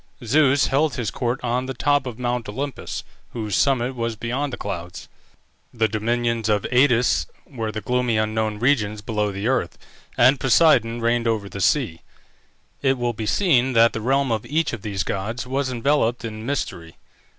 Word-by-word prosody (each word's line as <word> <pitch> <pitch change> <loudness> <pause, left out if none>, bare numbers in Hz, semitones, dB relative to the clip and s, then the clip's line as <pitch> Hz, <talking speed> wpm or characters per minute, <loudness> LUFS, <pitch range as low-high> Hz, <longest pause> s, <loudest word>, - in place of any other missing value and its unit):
Zeus 140 +2 +4
held 145 +3 +1
his 120 -4 -2
court 120 0 -2
on 125 +1 -1
the 135 - -4
top 145 +1 +1
of 120 -3 -6
Mount 120 -3 -2
Olympus, 135 +5 -5 0.3
whose 110 -5 -3
summit 130 -2 +2
was 115 -1 -2
beyond 125 +6 -3
the - - -5
clouds; 90 -3 -6 0.6
the 115 -2 +1
dominions 115 +1 -1
of 105 -2 +2
Aïdes 125 -2 +3 0.2
were 115 -5 -4
the 110 - -5
gloomy 125 -2 0
unknown 110 0 -1
regions 105 -4 +1
below 105 -1 -1
the 100 +2 -5
earth; 125 -10 0 0.4
and 130 +3 +5
Poseidon 125 -5 +3
reigned 120 0 +1
over 110 -3 0
the 100 0 -7
sea. 95 - +1 0.8
It 135 -1 +2
will 120 -1 -1
be 110 -1 -5
seen 130 - +2
that 115 0 +5
the 110 - -4
realm 135 +2 +1
of 110 -2 -1
each 160 0 0
of 115 - -5
these 100 -2 -2
gods 105 +7 -3
was 135 +1 -1
enveloped 125 -1 0
in 110 0 -6
mystery. 90 -12 -4
120 Hz, 175 wpm, -22 LUFS, 110-130 Hz, 0.8 s, and